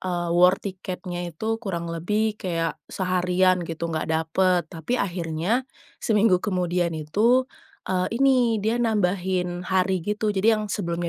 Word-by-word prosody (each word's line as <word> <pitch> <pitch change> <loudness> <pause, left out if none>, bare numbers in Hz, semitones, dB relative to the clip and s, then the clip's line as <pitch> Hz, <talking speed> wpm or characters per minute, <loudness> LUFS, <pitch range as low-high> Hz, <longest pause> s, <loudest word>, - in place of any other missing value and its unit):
eee, 175 -2 -2
war 180 +2 +5
tiketnya 180 -2 -5
itu 220 +7 -3
kurang 170 -6 -4
lebih 210 +6 -1
kayak 165 -3 -2
seharian 185 0 +1
gitu, 165 0 -5
nggak 155 - -2
dapet. 175 +3 +2
Tapi 165 +10 -2
akhirnya, 185 +7 -1 0.3
seminggu 210 -4 +3
kemudian 180 -4 -1
itu 220 +12 +2 0.4
e 185 -1 +1 0.2
ini 250 -5 +3
dia 220 +3 0
nambahin 185 -5 0
hari 185 -2 +1
gitu, 210 +1 -1
jadi 215 +2 +2
yang 210 - -5
sebelumnya 170 -3 -2
185 Hz, 135 wpm, -24 LUFS, 175-210 Hz, 0.4 s, war